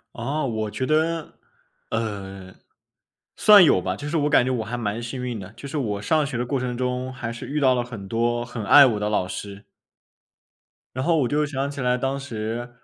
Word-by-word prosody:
啊， 140 Hz, +6 st, -2 dB
我 110 Hz, -4 st, -2 dB
觉 130 Hz, -, -2 dB
得， 160 Hz, +2 st, 0 dB, 0.6 s
呃， 95 Hz, -4 st, -5 dB, 0.8 s
算 205 Hz, -3 st, +8 dB
有 140 Hz, -, +5 dB
吧， 95 Hz, +1 st, -2 dB
就 145 Hz, +8 st, -6 dB
是 160 Hz, -, -1 dB
我 150 Hz, -1 st, +2 dB
感 125 Hz, -, +4 dB
觉 130 Hz, -, -1 dB
我 120 Hz, -4 st, -1 dB
还 120 Hz, +3 st, -4 dB
蛮 110 Hz, -1 st, -3 dB
幸 120 Hz, +2 st, -5 dB
运 120 Hz, -3 st, -3 dB
的。 95 Hz, -2 st, -8 dB
就 140 Hz, -, -8 dB
是 150 Hz, +2 st, -3 dB
我 105 Hz, -6 st, -2 dB
上 155 Hz, +5 st, +2 dB
学 135 Hz, -, -4 dB
的 120 Hz, -, -1 dB
过 135 Hz, +3 st, -1 dB
程 125 Hz, -1 st, -3 dB
中， 125 Hz, +1 st, -2 dB
还 120 Hz, -2 st, -5 dB
是 120 Hz, -, -8 dB
遇 150 Hz, +1 st, -2 dB
到 130 Hz, -2 st, +4 dB
了 125 Hz, -1 st, 0 dB
很 110 Hz, -5 st, -9 dB
多 120 Hz, +2 st, 0 dB
很 115 Hz, -3 st, -6 dB
爱 145 Hz, +7 st, +8 dB
我 115 Hz, -5 st, +2 dB
的 105 Hz, 0 st, -1 dB
老 95 Hz, -3 st, 0 dB
师。 100 Hz, +1 st, -7 dB, 1.3 s
然 130 Hz, -, -2 dB
后 170 Hz, -1 st, +2 dB
我 135 Hz, -5 st, +2 dB
就 150 Hz, +3 st, +1 dB
想 140 Hz, -1 st, -3 dB
起 140 Hz, -1 st, -6 dB
来 125 Hz, 0 st, +1 dB
当 135 Hz, +2 st, -1 dB
时， 120 Hz, -2 st, -5 dB
125 Hz, 235 characters per minute, -23 LUFS, 110-140 Hz, 1.3 s, 算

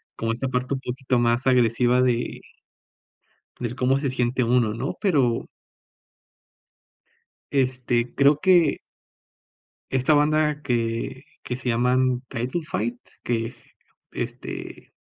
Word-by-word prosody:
como 115 Hz, 0 st, -2 dB
esta 125 Hz, +4 st, -2 dB
parte 125 Hz, +1 st, -1 dB
un -, -, -4 dB
poquito 130 Hz, 0 st, -1 dB
más 120 Hz, +2 st, +1 dB
agresiva 125 Hz, 0 st, +3 dB
de 120 Hz, -1 st, 0 dB, 1.2 s
del 120 Hz, 0 st, -3 dB
cómo 130 Hz, +1 st, +2 dB
se 140 Hz, -2 st, -1 dB
siente 125 Hz, 0 st, 0 dB
uno, 115 Hz, -2 st, +2 dB
¿no? 125 Hz, +4 st, -3 dB
Pero 135 Hz, -, +2 dB, 2.0 s
este, 125 Hz, -3 st, 0 dB
creo 140 Hz, +1 st, +4 dB
que 175 Hz, -5 st, +4 dB, 1.1 s
esta 130 Hz, +3 st, +2 dB
banda 150 Hz, 0 st, +2 dB
que 115 Hz, +1 st, -2 dB, 0.2 s
que 125 Hz, -, -3 dB
se 130 Hz, -1 st, -3 dB
llaman 125 Hz, +1 st, +2 dB
Title 125 Hz, +8 st, -3 dB
Fight 120 Hz, -3 st, -3 dB, 0.2 s
que, 115 Hz, 0 st, -2 dB, 0.6 s
este -, -, -6 dB
125 Hz, 110 wpm, -24 LUFS, 120-135 Hz, 2.0 s, creo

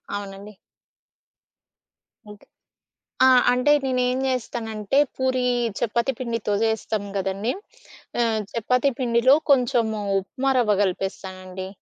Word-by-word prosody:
అవునండి. 200 Hz, +1 st, -8 dB, 1.8 s
ఓకె. 205 Hz, -, -15 dB, 0.8 s
ఆ! -, -, +7 dB, 0.2 s
అంటే 250 Hz, +4 st, +2 dB
నేనేం 255 Hz, -1 st, 0 dB
జేస్తానంటే 225 Hz, -2 st, -2 dB, 0.2 s
పూరీ, 260 Hz, -1 st, 0 dB, 0.4 s
చపాతీ 235 Hz, +3 st, 0 dB
పిండితో 230 Hz, -4 st, -2 dB
జేస్తాం 220 Hz, -2 st, -1 dB
గదండీ! 195 Hz, +5 st, -2 dB, 0.7 s
ఆహ్, 220 Hz, -2 st, 0 dB
చపాతీ 250 Hz, +4 st, +1 dB
పిండిలో 245 Hz, +1 st, +4 dB, 0.2 s
కొంచెము 235 Hz, -4 st, +2 dB, 0.2 s
ఉప్మా 260 Hz, +8 st, -2 dB
రవ్వ 210 Hz, -4 st, +2 dB
గలిపేస్తానండి. 185 Hz, 0 st, -4 dB
225 Hz, 90 wpm, -23 LUFS, 205-250 Hz, 1.8 s, ఆ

